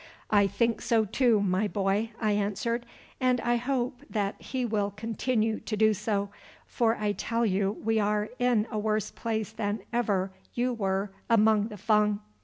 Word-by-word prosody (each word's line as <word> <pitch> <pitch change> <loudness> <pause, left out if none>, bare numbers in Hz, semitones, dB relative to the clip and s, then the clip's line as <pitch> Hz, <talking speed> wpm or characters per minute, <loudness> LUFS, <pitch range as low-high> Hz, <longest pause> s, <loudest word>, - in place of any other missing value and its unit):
"I 205 -2 +5
think 230 +4 0
so, 225 -2 +2
too, 230 0 +3
my 190 +2 +1
boy," 200 +2 0
I 215 -2 +1
answered, 210 +4 -1 0.3
"and 255 -1 +2
I 240 0 +2
hope 250 0 -2
that 205 -2 -2
He 255 -2 -2
will 210 -3 0
continue 220 +1 -1
to 215 - -4
do 215 0 +4
so, 205 -1 -2 0.3
for 230 -1 +1
I 210 -1 0
tell 230 +3 -1
you 195 -1 +1
we 225 0 0
are 210 0 +1
in 245 -4 +3
a 215 - -1
worse 215 -1 0
place 220 -2 -3
than 210 -1 -2
ever 200 -5 +1 0.2
you 245 +1 +1
were 195 -2 -1 0.2
among 220 -2 +4
the 210 -2 -9
Fung." 210 0 +2
215 Hz, 170 wpm, -28 LUFS, 205-230 Hz, 0.3 s, I